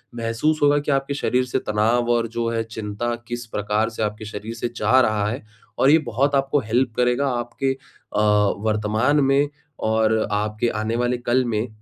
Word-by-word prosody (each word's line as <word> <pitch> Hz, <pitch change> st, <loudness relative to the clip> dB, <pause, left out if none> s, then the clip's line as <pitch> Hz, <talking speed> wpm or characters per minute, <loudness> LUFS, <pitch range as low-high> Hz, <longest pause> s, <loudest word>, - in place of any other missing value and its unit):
महसूस 120 Hz, +7 st, 0 dB
होगा 145 Hz, 0 st, +5 dB
कि 145 Hz, 0 st, -2 dB
आपके 135 Hz, 0 st, 0 dB
शरीर 130 Hz, -2 st, 0 dB
से 130 Hz, +1 st, -1 dB
तनाव 115 Hz, +2 st, +1 dB
और 115 Hz, -1 st, +2 dB
जो 115 Hz, +1 st, -3 dB
है 115 Hz, -1 st, -1 dB
चिंता 110 Hz, +1 st, -4 dB
किस 120 Hz, 0 st, -5 dB
प्रकार 105 Hz, +1 st, -1 dB
से 115 Hz, -1 st, -4 dB
आपके 105 Hz, +1 st, -3 dB
शरीर 105 Hz, +1 st, -6 dB
से 120 Hz, +1 st, -3 dB
जा 130 Hz, +2 st, +4 dB
रहा 110 Hz, -3 st, +1 dB
है। 120 Hz, +2 st, -5 dB, 0.4 s
और 135 Hz, -, +5 dB
ये 155 Hz, -, +7 dB
बहुत 135 Hz, +5 st, +1 dB
आपको 135 Hz, +1 st, +2 dB
हेल्प 120 Hz, 0 st, 0 dB
करेगा, 125 Hz, +3 st, +2 dB
आपके 125 Hz, +2 st, -1 dB
अ, 105 Hz, -5 st, -6 dB, 0.4 s
वर्तमान 110 Hz, +6 st, +1 dB
में 140 Hz, +2 st, +3 dB, 0.3 s
और 110 Hz, 0 st, +2 dB
आपके 105 Hz, +2 st, 0 dB
आने 110 Hz, +1 st, -2 dB
वाले 125 Hz, +1 st, 0 dB
कल 120 Hz, +1 st, +1 dB
में 110 Hz, 0 st, -1 dB
120 Hz, 185 wpm, -22 LUFS, 110-130 Hz, 0.4 s, ये